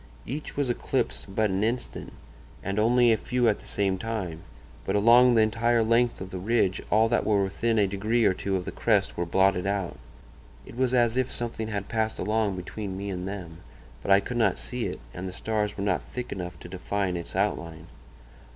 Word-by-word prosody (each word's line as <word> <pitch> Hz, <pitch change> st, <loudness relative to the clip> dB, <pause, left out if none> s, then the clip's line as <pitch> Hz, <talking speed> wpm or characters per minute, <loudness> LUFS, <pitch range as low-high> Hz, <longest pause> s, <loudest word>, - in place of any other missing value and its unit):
Each 145 Hz, +4 st, -6 dB
was 145 Hz, -2 st, +1 dB
eclipsed 120 Hz, -, -1 dB
but 110 Hz, -2 st, +2 dB
an 95 Hz, +2 st, 0 dB
instant, 120 Hz, +3 st, -3 dB, 0.5 s
and 100 Hz, +2 st, -1 dB
only 120 Hz, +2 st, +4 dB
a 110 Hz, -, +3 dB
few 125 Hz, 0 st, 0 dB
at 105 Hz, -, +2 dB
the -, -, -11 dB
same 95 Hz, -2 st, 0 dB
time, 95 Hz, -8 st, -4 dB, 0.4 s
but -, -, -1 dB
along 120 Hz, +4 st, +6 dB
the 110 Hz, -, +6 dB
entire 115 Hz, +1 st, +2 dB
length 115 Hz, +2 st, +2 dB
of 95 Hz, 0 st, -7 dB
the 95 Hz, -, -4 dB
ridge 100 Hz, -2 st, +1 dB
all 110 Hz, +2 st, +4 dB
that 120 Hz, -, +2 dB
were 100 Hz, -2 st, +2 dB
within 115 Hz, +4 st, 0 dB
a 105 Hz, -, +4 dB
degree 105 Hz, +4 st, +1 dB
or -, -, +4 dB
two 95 Hz, +1 st, -2 dB
of 90 Hz, -1 st, -2 dB
the -, -, -4 dB
crest 105 Hz, -4 st, +1 dB
were 85 Hz, 0 st, -2 dB
blotted 95 Hz, +1 st, +2 dB
out. 100 Hz, -8 st, -2 dB, 0.7 s
It -, -, -12 dB
was 130 Hz, 0 st, +1 dB
as 120 Hz, -1 st, +3 dB
if 130 Hz, 0 st, 0 dB
something 115 Hz, -2 st, -3 dB
had 100 Hz, -2 st, -3 dB
passed 110 Hz, -1 st, -1 dB
along 105 Hz, -2 st, 0 dB
between 95 Hz, +1 st, -5 dB
me 100 Hz, +1 st, -4 dB
and 90 Hz, 0 st, -4 dB
them; 90 Hz, -5 st, -6 dB, 0.4 s
but -, -, -6 dB
I 100 Hz, 0 st, +6 dB
could 120 Hz, +4 st, -4 dB
not 115 Hz, -, +2 dB
see 125 Hz, -2 st, -3 dB
it, -, -, -6 dB
and 90 Hz, +2 st, -5 dB
the -, -, -5 dB
stars 105 Hz, +1 st, -2 dB
were 100 Hz, -, -2 dB
not 100 Hz, -3 st, +1 dB
thick 125 Hz, -1 st, -7 dB
enough 90 Hz, -2 st, -5 dB
to -, -, -8 dB
define 95 Hz, +1 st, -2 dB
its 85 Hz, -1 st, -5 dB
outline. 80 Hz, 0 st, -2 dB
105 Hz, 210 wpm, -27 LUFS, 95-115 Hz, 0.7 s, along